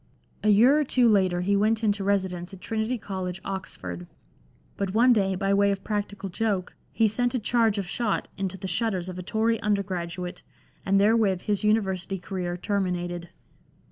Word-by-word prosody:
A 215 - +3
year 240 +8 +6
or - - +3
two 250 -3 +3
later 190 -5 +3
he 200 +3 +1
went 220 +2 +2
into 205 -2 +1
residence 190 -3 -1
at - - -14
Trinity 225 +5 -2
College, 190 -3 -5
Oxford, 90 - -6 0.7
but 200 0 -3
one 245 +2 +6
day, 195 -4 +1
by 195 +1 0
way 200 0 +4
of 195 -1 -3
practical 205 -2 -3
joke, 195 -1 -2 0.2
he 225 - +3
sent 245 +4 0
a - - +3
charge 225 -1 +2
of 200 - -1
shot 215 +3 -1
into 190 -1 -3
the 190 +1 -5
shutters 185 -1 -1
of 185 0 -6
a - - -3
Tory 220 +4 0
undergraduate, 180 -3 -2 0.5
and 195 0 +4
therewith 205 -3 +3
his 205 0 -1
university 195 -3 +1
career 180 -1 -4
terminated. 175 -3 -2
200 Hz, 170 wpm, -26 LUFS, 185-220 Hz, 0.7 s, year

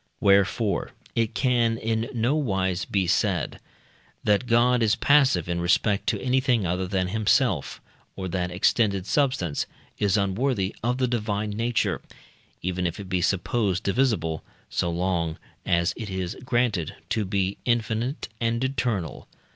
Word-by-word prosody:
Wherefore 100 +2 +2 0.2
it 115 -2 0
can 120 -3 +2
in 115 0 -1
nowise 110 - 0
be 95 -2 0
said, 90 -1 0 0.6
that 105 +4 +2
God 120 +1 +4
is 110 -2 +3
passive 135 - +4
in 85 0 -1
respect 100 +3 +2
to - - +1
anything 125 -4 +1
other 90 +2 -1
than 95 -1 0
himself, 110 +1 +1 0.4
or 95 -1 -4
that 90 0 -1
extended 100 +1 +1
substance 125 - 0 0.3
is 100 -1 +2
unworthy 100 +1 0
of 125 +2 0
the 130 -1 +1
Divine 105 -3 -1
nature, 115 +2 0 0.6
even 90 0 -1
if 85 - -5
it 100 -2 -8
be 90 -1 0
supposed 95 +1 0
divisible, 100 - 0 0.3
so 85 - 0
long 85 -2 -1 0.3
as 85 0 +2
it 110 -3 -6
is 95 -2 -3
granted 120 - 0
to 110 -2 0
be 95 0 -1
infinite 120 +3 -1
and 115 +1 0
eternal. 120 - -2
105 Hz, 140 wpm, -25 LUFS, 95-120 Hz, 0.6 s, God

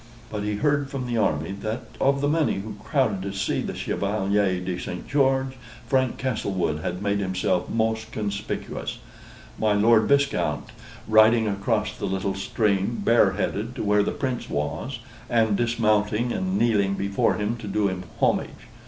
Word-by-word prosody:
But 105 -1 -3
he 105 0 -1
heard 145 +3 +1
from 135 -2 -4
the 120 -1 -2
army, 80 -6 +1
that 110 +2 -3 0.2
of 140 0 +3
the 145 - +2
many 155 0 +2
who 105 +2 -5
crowded 110 -9 +1
to 100 +1 -4
see 100 0 -1
the - - -4
Chevalier 100 -2 0
de 90 0 -3
St. 90 - -6
George, 135 -1 +2 0.3
Frank 130 -2 +1
Castlewood 95 - -1
had 90 +4 -3
made 100 0 +1
himself 95 -2 0
most 110 0 -1
conspicuous: 100 -2 -4 0.6
my 110 -1 +3
Lord 110 +1 +4
Viscount 140 0 +1 0.4
riding 110 +1 +5
across 105 +1 -1
the 100 - -3
little 95 0 -1
stream 100 +2 0
bareheaded 105 +1 +2
to - - -3
where 105 0 +3
the 100 - 0
Prince 130 -4 -3
was, 75 - -3 0.3
and 110 -3 +3
dismounting 110 0 +1
and 190 0 -1
kneeling 100 - +2
before 100 0 +1
him 105 +2 -1
to 110 -2 -8
do 100 +1 +1
him 95 -1 -3 0.2
homage. - - +2
105 Hz, 160 wpm, -25 LUFS, 100-120 Hz, 0.6 s, riding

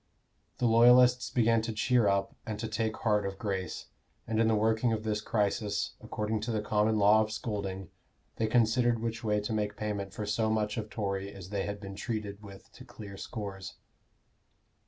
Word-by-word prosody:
The 125 - 0
Loyalists 125 +2 +6
began 115 -2 +3
to 115 - -3
cheer 120 +1 +2
up 100 0 0
and 110 -2 -4
to 110 +1 -4
take 110 0 -2
heart 105 -2 +1
of 100 0 -4
grace, 95 -3 -3 0.4
and 110 -1 -1
in 115 - +3
the 110 - +3
working 110 +2 +2
of 110 -1 -3
this 105 -1 -1
crisis, 105 -1 -1
according 105 +1 -2
to 110 +3 -3
the 110 - 0
common 110 +1 +2
law 105 +1 +6
of 110 0 -2
scolding, 100 -5 -4 0.5
they 110 - +1
considered 120 +1 +3
which 115 +1 -4
way 105 -1 +1
to 105 +2 -3
make 105 -1 -2
payment 100 -2 -3
for 105 +2 -5
so 110 +2 0
much 105 -1 0
of 110 -1 -4
Tory 100 -2 -3
as 95 -2 -10
they 100 -2 -1
had 100 0 -4
been 100 -1 -8
treated 105 -2 -4
with 100 -2 -13
to - - -13
clear 100 -2 -10
scores. 100 -2 -6
105 Hz, 190 wpm, -30 LUFS, 100-110 Hz, 0.5 s, Loyalists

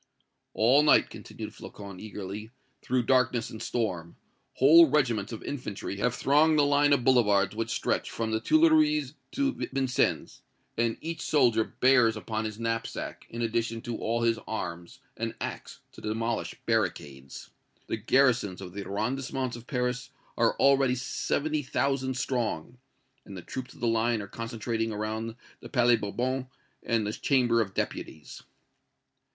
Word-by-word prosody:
"All 125 +6 +5
night," 150 - +4
continued - - -8
Flocon, 100 -3 -10
eagerly, 105 0 -7 0.3
"through 125 0 0
darkness 125 -2 +2
and 110 - -8
storm, 90 -8 -3 0.4
whole 160 +4 +7
regiments 120 -8 +1
of 110 - -7
infantry 105 -7 -5
have 120 +3 0
thronged 155 +3 +4
the 145 - +5
line 145 0 +3
of 140 -3 +3
boulevards 105 -6 +3
which 115 +1 -2
stretch - - -1
from 115 -1 -3
the 110 - +1
Tuileries 310 - +3 0.2
to 280 0 +1 0.2
Vincennes, 135 -2 0 0.3
and 115 0 0
each 165 0 -5
soldier 120 -7 +3
bears 125 -2 +3
upon 110 0 -3
his 110 -1 -5
knapsack, 115 0 -4
in 115 +1 -4
addition 115 0 -1
to 120 0 -4
all 115 +1 -1
his 115 -1 +2
arms, 105 +3 -5 0.2
an 115 0 -3
axe - - -6
to - - -13
demolish 115 +1 -2
barricades. 70 -2 -2 0.3
The - - -3
garrisons 120 -4 +2
of 90 -2 -9
the 100 0 -5
arrondissements 125 +5 -2
of 120 0 -12
Paris 125 -1 -2 0.3
are 115 -1 +2
already 135 -2 +4
seventy 150 +4 -1
thousand 135 -1 -1
strong; 120 -4 -2 0.4
and 95 - -10
the 90 - -8
troops 130 -1 -7
of - - -17
the 120 - +1
Line 115 0 +1
are - - -8
concentrating 115 0 -3
around 110 +2 -3 0.2
the - - -11
Palais 120 -2 +4
Bourbon 125 +5 -2 0.3
and 115 -3 0
the 105 - -2
Chamber 120 -3 +2
of 95 -3 -4
Deputies." 75 -1 -5
115 Hz, 150 wpm, -28 LUFS, 110-130 Hz, 0.4 s, whole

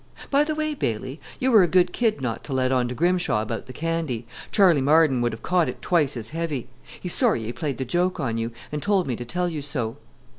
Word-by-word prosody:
By 285 +1 +5
the 305 0 -2
way, 310 0 -1
Bailey, 130 - -3 0.2
you 260 +1 +2
were 220 -4 +8
a 180 - +4
good 180 +2 +3
kid 225 - +1
not 115 -4 -3
to 140 - -5
let 130 0 +1
on 125 -2 +2
to 125 - -4
Grimshaw 175 -5 +2
about 110 +3 -5
the - - -8
candy. 155 -5 -2 0.2
Charley 180 -8 +4
Marden 145 -2 +4
would 120 0 +1
have 110 - -9
caught 180 -2 +2
it - - -7
twice 150 -7 +1
as 110 -1 -5
heavy. 160 -6 -3 0.3
He's 180 - -2
sorry 220 - +2
he 115 +2 -4
played 135 +2 -3
the 130 - -3
joke 175 +7 0
on 120 -7 -1
you, 115 +1 -2 0.2
and 150 0 -3
told 200 -1 +2
me 125 - -2
to 120 - -6
tell 180 +8 -1
you 160 -4 -3
so. 130 -6 -3
150 Hz, 245 wpm, -24 LUFS, 125-180 Hz, 0.3 s, were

